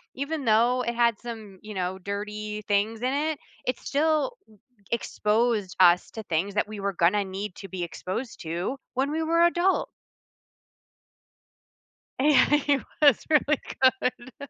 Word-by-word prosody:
even 280 Hz, +1 st, -3 dB
though 235 Hz, +3 st, +3 dB
it 235 Hz, -, -2 dB
had 235 Hz, -2 st, +3 dB
some, 220 Hz, -5 st, -8 dB
you 215 Hz, 0 st, -8 dB
know, 185 Hz, -1 st, -2 dB
dirty 210 Hz, +2 st, -5 dB
things 215 Hz, +2 st, +1 dB
in 255 Hz, +1 st, 0 dB
it, 305 Hz, +1 st, -1 dB, 0.3 s
it 250 Hz, -1 st, -1 dB
still 310 Hz, -, +1 dB, 0.2 s
e -, -, -19 dB, 0.4 s
exposed 215 Hz, -3 st, 0 dB
us 180 Hz, -1 st, +5 dB
to 220 Hz, -, -6 dB
things 180 Hz, +2 st, -1 dB
that 210 Hz, -, 0 dB
we 215 Hz, -1 st, -7 dB
were 200 Hz, 0 st, -2 dB
gonna 185 Hz, +4 st, +2 dB
need 190 Hz, 0 st, -5 dB
to 195 Hz, -, -9 dB
be 185 Hz, -2 st, -4 dB
exposed 190 Hz, +8 st, -5 dB
to 170 Hz, +9 st, -3 dB, 0.2 s
when 265 Hz, +3 st, 0 dB
we 320 Hz, +1 st, -1 dB
were 330 Hz, +1 st, +1 dB
adult. 345 Hz, +2 st, +2 dB, 2.3 s
Yeah, 290 Hz, 0 st, +5 dB
it 290 Hz, -2 st, +2 dB, 0.2 s
was 285 Hz, -6 st, +5 dB
really 300 Hz, -1 st, +3 dB, 0.4 s
good. 255 Hz, +3 st, -4 dB
225 Hz, 150 wpm, -26 LUFS, 200-280 Hz, 2.3 s, us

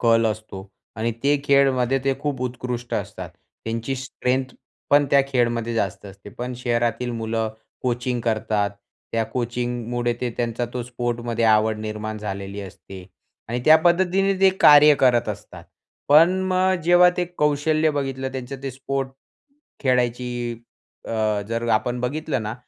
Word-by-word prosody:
कल 115 Hz, -1 st, +4 dB
असतो 105 Hz, -3 st, -5 dB, 0.3 s
आणि 115 Hz, +1 st, -1 dB
ते 145 Hz, +1 st, +3 dB
खेळमध्ये 135 Hz, -2 st, +3 dB
ते 135 Hz, -, +2 dB
खूप 145 Hz, -3 st, -3 dB
उत्कृष्ट 125 Hz, -1 st, -4 dB
असतात. -, -, -5 dB, 0.3 s
त्यांची 115 Hz, +3 st, -3 dB
स्ट्रेंथ 130 Hz, 0 st, -2 dB, 0.4 s
पण 145 Hz, 0 st, +5 dB
त्या 140 Hz, -, +6 dB
खेळमध्ये 120 Hz, -3 st, 0 dB
जास्त 100 Hz, -4 st, -2 dB
असते. 100 Hz, +1 st, -12 dB
पण 125 Hz, +4 st, -6 dB
शहरातील 120 Hz, 0 st, -1 dB
मुलं 115 Hz, -1 st, -2 dB, 0.3 s
कोचिंग 125 Hz, 0 st, -1 dB
करतात. 110 Hz, -2 st, 0 dB, 0.4 s
त्या 115 Hz, -1 st, +1 dB
कोचिंगमुळे 120 Hz, 0 st, -2 dB
ते 125 Hz, -, -1 dB
त्यांचा 120 Hz, 0 st, -2 dB
तो 125 Hz, -, -2 dB
स्पोर्टमध्ये 120 Hz, -1 st, -2 dB
आवड 110 Hz, 0 st, +3 dB
निर्माण 110 Hz, 0 st, -5 dB
झालेली 100 Hz, -1 st, -5 dB
असते 95 Hz, 0 st, -10 dB, 0.4 s
आणि 120 Hz, +1 st, -2 dB
त्या 155 Hz, +1 st, +8 dB
पद्धतीने 190 Hz, +3 st, +3 dB
ते 195 Hz, 0 st, +6 dB
कार्य 150 Hz, 0 st, +8 dB
करत 125 Hz, -3 st, +3 dB
असतात. -, -, -7 dB, 0.4 s
पण 165 Hz, +6 st, +6 dB
अ, -, -, -2 dB
मग 185 Hz, 0 st, +2 dB
जेव्हा 175 Hz, +1 st, +6 dB
ते 180 Hz, -, +1 dB
कौशल्य 155 Hz, +1 st, +2 dB
बघितलं 135 Hz, -2 st, -3 dB
त्यांचं 130 Hz, +1 st, -6 dB
ते 135 Hz, -, -3 dB
स्पोर्ट 135 Hz, +1 st, -3 dB, 0.7 s
खेळायची 125 Hz, -2 st, +1 dB, 0.7 s
अ, 110 Hz, -2 st, 0 dB
जर 115 Hz, +1 st, -2 dB
आपण 120 Hz, +3 st, 0 dB
बघितलं 140 Hz, 0 st, -2 dB
ना, 110 Hz, +1 st, -4 dB
120 Hz, 145 wpm, -23 LUFS, 115-135 Hz, 0.7 s, त्या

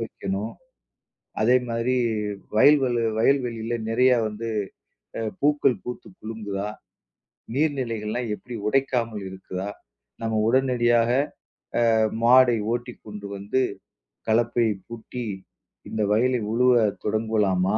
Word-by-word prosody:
வைக்கணும். 100 Hz, -1 st, -4 dB, 0.9 s
அதேமாதிரி 120 Hz, +1 st, +2 dB, 0.6 s
வயல்வள 135 Hz, 0 st, +5 dB, 0.2 s
வயல்வெளில 120 Hz, -2 st, +1 dB
நிறையா 125 Hz, +2 st, +4 dB
வந்து 110 Hz, +2 st, -5 dB, 0.7 s
அ -, -, -2 dB, 0.2 s
பூக்கள் 145 Hz, -3 st, +3 dB
பூத்து 125 Hz, -1 st, -7 dB
குலுங்குதா? 105 Hz, -2 st, -4 dB, 0.9 s
நீர் 150 Hz, +1 st, +2 dB
நிலைகள்லாம் 115 Hz, 0 st, -3 dB
எப்பிடி 120 Hz, +2 st, -8 dB
உடைக்காம 125 Hz, -2 st, +1 dB, 0.2 s
இருக்குதா? 95 Hz, +1 st, -6 dB, 0.5 s
நம்ம 110 Hz, -1 st, 0 dB
உடனடியாக 120 Hz, -2 st, +3 dB, 0.9 s
அ -, -, +3 dB, 0.3 s
மாடை 125 Hz, -1 st, +6 dB, 0.2 s
ஓட்டிக்கொண்டு 110 Hz, -4 st, -6 dB
வந்து, 100 Hz, +7 st, 0 dB, 0.7 s
கலப்பையைப் 115 Hz, -3 st, +1 dB
பூட்டி 115 Hz, +1 st, -6 dB, 0.6 s
இந்த 110 Hz, -1 st, -1 dB
வயலை 125 Hz, +3 st, +2 dB
உழுவ 125 Hz, +2 st, +4 dB, 0.3 s
தொடங்கலாமா?" 105 Hz, -3 st, +1 dB
115 Hz, 90 wpm, -25 LUFS, 110-125 Hz, 0.9 s, மாடை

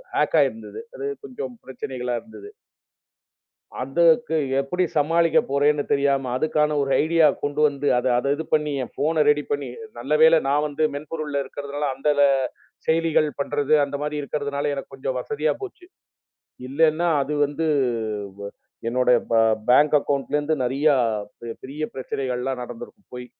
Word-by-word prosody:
Hack -, -, +1 dB
ஆயிருந்தது. 440 Hz, -, -3 dB, 0.2 s
அது 420 Hz, -, -4 dB, 0.2 s
கொஞ்சம் 135 Hz, -, -7 dB
பிரச்சனைகளா 125 Hz, -2 st, -4 dB
இருந்தது. 310 Hz, -, -12 dB, 1.3 s
அதுக்கு 165 Hz, -, +3 dB, 0.2 s
எப்படி 160 Hz, +7 st, -1 dB
சமாளிக்க 165 Hz, +3 st, +3 dB
போறேன்னு 145 Hz, +1 st, +2 dB
தெரியாம 140 Hz, -2 st, +1 dB
அதுக்கான 150 Hz, 0 st, +1 dB
ஒரு 135 Hz, -1 st, -1 dB
ஐடியா 165 Hz, 0 st, +4 dB, 0.2 s
கொண்டு 145 Hz, +1 st, -2 dB
வந்து 145 Hz, 0 st, -3 dB
அத 125 Hz, -, 0 dB
அத 140 Hz, +3 st, 0 dB
இது 160 Hz, -, -4 dB
பண்ணி 150 Hz, -1 st, +2 dB
என் -, -, -9 dB
ஃபோன்ன 155 Hz, +1 st, +1 dB
ரெடி 150 Hz, 0 st, +3 dB
பண்ணி. 145 Hz, -1 st, -1 dB, 0.3 s
நல்லவேளை 150 Hz, +6 st, +4 dB
நான் 145 Hz, +2 st, +2 dB
வந்து 150 Hz, +1 st, -2 dB
மென்பொருள் 150 Hz, 0 st, -5 dB
இருக்கறதால 145 Hz, +1 st, -4 dB
அந்தச் 145 Hz, +2 st, +1 dB, 0.6 s
செயலிகள் 160 Hz, -1 st, +2 dB
பண்றது 145 Hz, +1 st, 0 dB
அந்த 140 Hz, 0 st, -3 dB
மாரி 150 Hz, 0 st, -3 dB
இருக்கறதுனால 145 Hz, 0 st, -2 dB
எனக்குக் 135 Hz, -1 st, -7 dB
கொஞ்சம் 130 Hz, -1 st, -3 dB
வசதியா 145 Hz, +4 st, -1 dB
போச்சு. 380 Hz, -2 st, -9 dB, 0.8 s
இல்லன்னா 160 Hz, +4 st, +2 dB
அது 140 Hz, +2 st, -4 dB
வந்து 145 Hz, +3 st, -3 dB, 1.2 s
என்னோட 125 Hz, +1 st, +1 dB, 0.2 s
பே 115 Hz, -, +4 dB, 0.3 s
பேங்க் 145 Hz, +5 st, +5 dB
அக்கவுன்ட்ல 140 Hz, +1 st, -1 dB
இருந்து 150 Hz, +2 st, 0 dB
நெறையா 140 Hz, +4 st, +2 dB, 0.7 s
பெரிய 145 Hz, +4 st, -7 dB
பிரச்சனைகள்லாம் 130 Hz, -1 st, -3 dB
நடந்திருக்கும் 120 Hz, -, -10 dB
போயி 125 Hz, 0 st, -7 dB
145 Hz, 135 wpm, -23 LUFS, 135-155 Hz, 1.3 s, பேங்க்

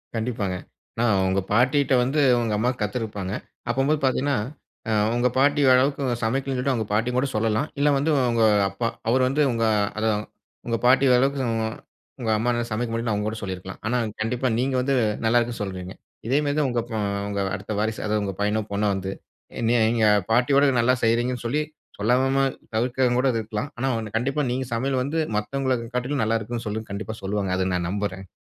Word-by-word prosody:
கண்டிப்பாங்க. 110 Hz, -5 st, -2 dB, 0.4 s
ஆனா 120 Hz, -, +1 dB, 0.2 s
உங்க 95 Hz, +1 st, +1 dB
பாட்டிட்ட 130 Hz, +5 st, +3 dB
வந்து 135 Hz, +5 st, 0 dB, 0.2 s
உங்க 115 Hz, -2 st, -1 dB
அம்மா 120 Hz, +4 st, +1 dB
கத்துருப்பாங்க. 105 Hz, -3 st, -3 dB, 0.4 s
அப்பம்போது 135 Hz, +5 st, +1 dB
பார்த்தீங்கன்னா, 135 Hz, +2 st, +1 dB, 0.5 s
அ -, -, 0 dB, 0.2 s
உங்க 120 Hz, +1 st, +2 dB
பாட்டி 145 Hz, +2 st, +3 dB
ஓரளவுக்கு 135 Hz, +2 st, +3 dB, 0.2 s
சமைக்கலன்னு 135 Hz, +4 st, -1 dB
சொல்லிட்டு, 130 Hz, +2 st, +1 dB
அவங்க 110 Hz, -3 st, -2 dB
பாட்டியும் 120 Hz, +4 st, +1 dB
கூட 140 Hz, -, +1 dB
சொல்லலாம். 110 Hz, +5 st, +1 dB
இல்லை 145 Hz, +1 st, +4 dB
வந்து 145 Hz, +4 st, +1 dB, 0.2 s
உங்க 115 Hz, -1 st, +2 dB, 0.3 s
அப்பா. 100 Hz, +4 st, -2 dB, 0.2 s
அவர் 130 Hz, +2 st, +3 dB
வந்து 135 Hz, +4 st, +1 dB
உங்க 115 Hz, -1 st, -1 dB, 0.3 s
அதான் 110 Hz, -1 st, 0 dB, 0.4 s
உங்க 115 Hz, -1 st, 0 dB
பாட்டி 130 Hz, +2 st, +5 dB
வரளவுக்கு 135 Hz, +2 st, +2 dB, 0.8 s
உங்க 115 Hz, -, -2 dB
அம்மானால்ல 120 Hz, +1 st, 0 dB
சமைக்க 115 Hz, +2 st, -2 dB
முடியலன்னு 115 Hz, -1 st, -1 dB
அவங்க 105 Hz, +1 st, -1 dB
கூட 110 Hz, -, -6 dB
சொல்லியிருக்கலாம். 95 Hz, -1 st, -6 dB
ஆனா 125 Hz, +3 st, +1 dB, 0.2 s
கண்டிப்பா 125 Hz, +4 st, 0 dB
நீங்க 130 Hz, +1 st, 0 dB
வந்து 135 Hz, +2 st, 0 dB, 0.3 s
நல்லாயிருக்குனு 120 Hz, 0 st, +1 dB
சொல்றீங்க. 95 Hz, -1 st, -6 dB, 0.3 s
இதேமாரிதான் 145 Hz, +2 st, +1 dB
உங்க 120 Hz, -1 st, 0 dB
இப்ப 120 Hz, -2 st, -6 dB, 0.3 s
உங்க 100 Hz, -1 st, -2 dB, 0.2 s
அடுத்த 100 Hz, +2 st, -5 dB
வாரிசு, 110 Hz, +1 st, -1 dB
அதாவது 105 Hz, -1 st, 0 dB
உங்க 100 Hz, -1 st, -3 dB
பையனோ 105 Hz, +1 st, +1 dB
பொண்ணோ 105 Hz, +1 st, 0 dB
வந்து, 95 Hz, 0 st, -4 dB, 0.5 s
என்னைய 120 Hz, +1 st, +3 dB
எங்க 115 Hz, -2 st, +2 dB, 0.3 s
பாட்டியோட 135 Hz, +5 st, +4 dB
நல்லா 120 Hz, +2 st, +4 dB
செய்கிறீங்கன்னு 120 Hz, +2 st, +1 dB
சொல்லி, 140 Hz, +6 st, +1 dB, 0.4 s
சொல்லாம 130 Hz, +5 st, +2 dB, 0.3 s
தவிர்க்கிறவங்க 125 Hz, +1 st, +1 dB
கூட 135 Hz, +1 st, +3 dB
அது 115 Hz, -2 st, -1 dB
இருக்கலாம். 110 Hz, +5 st, -4 dB
ஆனா 130 Hz, +2 st, -1 dB
ஒண்ணு, 110 Hz, -1 st, -6 dB
கண்டிப்பா 135 Hz, +5 st, 0 dB
நீங்க 130 Hz, +1 st, -2 dB
சமையல் 130 Hz, +2 st, 0 dB
வந்து 150 Hz, +5 st, -1 dB, 0.2 s
மத்தவங்கள 130 Hz, +4 st, 0 dB, 0.2 s
காட்டிலும் 125 Hz, +1 st, 0 dB
நல்லாயிருக்குன்னு 115 Hz, +2 st, -2 dB
சொல்லுன்னு 110 Hz, 0 st, -4 dB
கண்டிப்பா 110 Hz, +2 st, -5 dB
சொல்லுவாங்க. 100 Hz, -1 st, -1 dB
அதை 95 Hz, 0 st, 0 dB
நான் 85 Hz, -1 st, -1 dB
நம்புறேன். 95 Hz, -1 st, -3 dB
120 Hz, 170 wpm, -24 LUFS, 105-130 Hz, 0.8 s, பாட்டி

